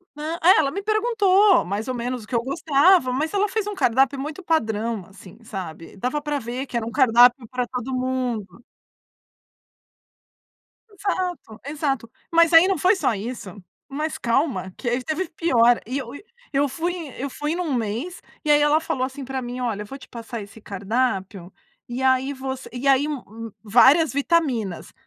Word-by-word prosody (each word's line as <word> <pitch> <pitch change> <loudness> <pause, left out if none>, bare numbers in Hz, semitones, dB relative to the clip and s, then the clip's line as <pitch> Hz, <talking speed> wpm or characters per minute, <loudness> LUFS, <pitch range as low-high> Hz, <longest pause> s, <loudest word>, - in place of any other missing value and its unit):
Ah, 310 +3 -4
ai 365 +4 +7
ela 280 -3 +2
me 395 - -4
perguntou 420 -3 +3
mais 200 +6 -3
ou 255 - -2
menos 245 0 -4
o - - -15
que - - -11
eu 235 - +2
gostava, 285 +2 +3
mas 305 +7 -1
ela 405 +1 +2
fez 420 +1 -2
um 415 - -4
cardápio 270 -3 +2
muito 300 +6 -6
padrão, 225 - -1
assim, 190 0 -15
sabe, 185 -7 -8
dava 255 +8 -2
pra 295 -1 -2
ver 245 +2 -5
que 255 - -10
era 235 -1 0
um 230 - -5
cardápio 245 -1 +5
pra 250 -1 -2
todo 255 +1 -5
mundo. 245 -6 -3 2.3
Exato, 365 - -4
exato, 275 -6 -2 0.2
mas 335 0 +4
aí 330 +3 +8
não 385 - +1
foi 370 +4 +4
só 315 - +1
isso, 205 -2 -7 0.3
mas 305 +3 -3
calma, 235 - 0
que 250 - -7
aí 245 +1 -1
teve 320 +5 -2
pior, 245 -8 +3
e 255 +4 -3 0.6
eu 280 +1 +2
fui 340 +6 -2 0.2
eu 275 +2 -3
fui 295 +4 -3
num 345 -5 -2
mês, 240 - -3 0.2
e 300 - -3
aí 295 0 +5
ela 295 +1 +4
falou 295 -5 -2
assim 265 +2 -4
pra 265 0 -4
mim: 245 0 -6
"Olha, 225 -5 -2
vou 270 +6 -9
te - - -14
passar 235 -1 -7
esse 205 +2 -12
cardápio 195 -3 -2 0.4
e 245 +2 -4
aí 260 +1 +2
você" 265 -1 -6
e 255 +2 -3
aí 270 +1 +4 0.6
várias 265 +8 +5
vitaminas, 275 - 0
260 Hz, 170 wpm, -23 LUFS, 235-315 Hz, 2.3 s, aí